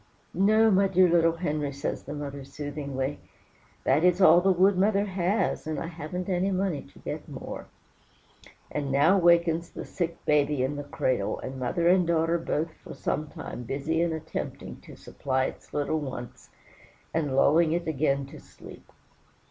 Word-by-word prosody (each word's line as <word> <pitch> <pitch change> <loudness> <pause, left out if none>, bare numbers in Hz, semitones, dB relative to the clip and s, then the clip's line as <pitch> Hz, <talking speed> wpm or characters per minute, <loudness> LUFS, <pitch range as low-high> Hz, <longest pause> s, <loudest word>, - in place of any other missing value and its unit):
"No, 215 +4 +4
my 195 0 +4
dear 185 -1 +4
little 165 -1 +3
Henry," 150 -4 -2
says 140 0 -4
the 150 - -7
mother 140 -1 -6
soothingly, 140 0 -4 0.6
"that 145 +5 +2
is 180 0 +4
all 175 -2 +7
the 190 +1 +3
wood 190 +2 +4
mother 200 +2 +2
has, 190 -2 -1
and 155 - -2
I - - -3
haven't 170 +2 -5
any 185 0 +1
money 185 -6 -1
to - - -18
get - - -6
more." - - -7 1.0
And 145 -2 -2
now 155 +8 +4
wakens 170 -1 +3
the - - -8
sick 170 -2 -3
baby 145 -2 +2
in 135 +3 -1
the 145 - -5
cradle, 130 -7 -1
and 130 0 -6
mother 170 +8 0
and 180 -1 +4
daughter 165 0 +2
are - - -6
both 165 0 -2
for - - -9
some 155 - -2
time 135 - -8
busy 140 +7 -2
in 170 -1 +1
attempting 160 -1 -5
to - - -13
supply 130 -1 -2
its - - -8
little 150 +2 -1
wants, 130 -4 -7 0.6
and 150 -5 -1
lulling 155 +4 +4
it 170 +1 -1
again 140 -2 0
to 140 - -12
sleep. - - -14
160 Hz, 170 wpm, -27 LUFS, 140-180 Hz, 1.0 s, all